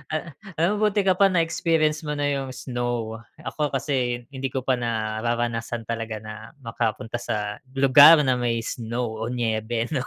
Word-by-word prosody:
Ah, 155 Hz, +3 st, -4 dB, 0.2 s
alam 170 Hz, +6 st, +1 dB
mo, 215 Hz, -, +3 dB
buti 210 Hz, -1 st, +1 dB
ka 190 Hz, -1 st, +2 dB
pa 200 Hz, -, +6 dB
na-experience 165 Hz, -3 st, +1 dB
mo 150 Hz, -, -2 dB
na 145 Hz, 0 st, 0 dB
yung 135 Hz, -2 st, -3 dB
snow. 120 Hz, -3 st, -3 dB, 0.2 s
Ako 150 Hz, -3 st, -3 dB
kasi 125 Hz, -3 st, -1 dB
hindi 135 Hz, -1 st, -4 dB
ko 130 Hz, -, -1 dB
pa 130 Hz, -1 st, +1 dB
nararanasan 115 Hz, +1 st, -2 dB
talaga 115 Hz, -1 st, -4 dB
na 110 Hz, +4 st, -10 dB
makapunta 115 Hz, -1 st, -3 dB
sa 105 Hz, -3 st, -3 dB, 0.2 s
lugar 145 Hz, +4 st, +8 dB
na 130 Hz, -3 st, +1 dB
may 115 Hz, -1 st, 0 dB
snow 115 Hz, -1 st, -4 dB
o 110 Hz, -, -3 dB
niyebe, 115 Hz, -1 st, -1 dB
'no. 135 Hz, -5 st, -2 dB
125 Hz, 165 wpm, -24 LUFS, 115-150 Hz, 0.2 s, lugar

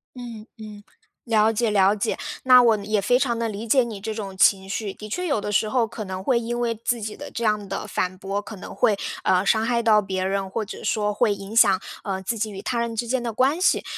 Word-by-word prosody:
嗯 235 Hz, -3 st, -9 dB
嗯， 210 Hz, -2 st, -10 dB, 0.4 s
了 220 Hz, -2 st, +3 dB
解 225 Hz, +1 st, 0 dB
了 200 Hz, -1 st, +4 dB
解， 215 Hz, +2 st, -2 dB, 0.3 s
那 255 Hz, -1 st, +8 dB
我 225 Hz, -2 st, +4 dB
呢， 200 Hz, -, -8 dB
也 215 Hz, 0 st, +1 dB
非 245 Hz, +5 st, +3 dB
常 240 Hz, -4 st, 0 dB
地 230 Hz, -, -1 dB
理 215 Hz, +1 st, -6 dB
解 260 Hz, +3 st, +4 dB
你 225 Hz, -4 st, -6 dB
这 220 Hz, +2 st, -4 dB
种 200 Hz, -3 st, -6 dB
情 190 Hz, 0 st, +3 dB
绪。 200 Hz, +1 st, -3 dB
的 215 Hz, -, -10 dB
确 360 Hz, -, -2 dB
有 285 Hz, -8 st, +1 dB
的 205 Hz, -, -4 dB
时 210 Hz, +1 st, +1 dB
候， 245 Hz, 0 st, +2 dB
可 220 Hz, 0 st, -7 dB
能 190 Hz, 0 st, -6 dB
会 240 Hz, +2 st, +2 dB
因 240 Hz, +1 st, -3 dB
为 235 Hz, -1 st, 0 dB
自 230 Hz, +1 st, -2 dB
己 210 Hz, 0 st, -5 dB
的 -, -, -9 dB
这 235 Hz, -, -4 dB
样 210 Hz, -2 st, 0 dB
的 -, -, -4 dB
反 185 Hz, 0 st, -2 dB
驳， 195 Hz, +2 st, -3 dB
可 210 Hz, +1 st, -9 dB
能 190 Hz, -, -9 dB
会， 210 Hz, -, +2 dB, 0.3 s
呃， 185 Hz, +1 st, +2 dB
伤 220 Hz, +1 st, +3 dB
害 235 Hz, 0 st, 0 dB
到 215 Hz, -2 st, +5 dB
别 190 Hz, -2 st, -3 dB
人， 195 Hz, 0 st, -1 dB
或 215 Hz, +3 st, -3 dB
者 200 Hz, -, -9 dB
说 210 Hz, -1 st, 0 dB
会 215 Hz, 0 st, +2 dB
影 195 Hz, +2 st, -9 dB
响， 195 Hz, -4 st, +5 dB, 0.2 s
呃， 190 Hz, -2 st, -3 dB
自 225 Hz, +5 st, -3 dB
己 215 Hz, +1 st, -2 dB
与 195 Hz, -1 st, -7 dB
他 245 Hz, -2 st, -1 dB
人 235 Hz, -1 st, -2 dB
之 235 Hz, +2 st, -2 dB
间 255 Hz, +1 st, 0 dB
的 235 Hz, -1 st, -3 dB
关 270 Hz, +9 st, +1 dB
系。 -, -, +3 dB
215 Hz, 280 characters per minute, -23 LUFS, 200-235 Hz, 0.4 s, 那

